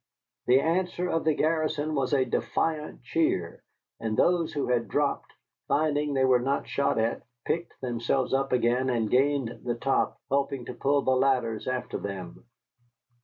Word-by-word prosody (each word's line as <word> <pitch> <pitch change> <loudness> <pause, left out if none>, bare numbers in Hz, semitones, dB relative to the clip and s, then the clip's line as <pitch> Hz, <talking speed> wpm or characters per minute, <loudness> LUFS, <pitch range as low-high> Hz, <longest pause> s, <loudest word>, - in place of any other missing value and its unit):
The 125 +2 +6
answer 175 +3 0
of 165 -2 -1
the 155 -2 +3
garrison 155 -1 0
was 135 -3 0
a 135 -2 +3
defiant 155 -3 -2
cheer, 120 - -1 0.4
and 110 -1 -2
those 175 -2 +2
who 145 - -1
had 120 -2 0
dropped, 145 -1 -1 0.4
finding 145 -1 +1
they 130 0 +3
were 130 -1 +4
not 135 +3 -1
shot 140 -3 0
at, 115 +1 0 0.2
picked 170 +1 -3
themselves 125 +1 -1
up 135 0 +1
again 125 +1 +2
and 115 -4 0
gained 135 -2 +1
the 120 -1 -1
top, 135 +3 0
helping 140 -2 0
to - - -6
pull 140 0 +1
the 130 - +2
ladders 130 -4 +1
after 130 0 -3
them. 95 0 -7
135 Hz, 160 wpm, -27 LUFS, 125-150 Hz, 0.4 s, The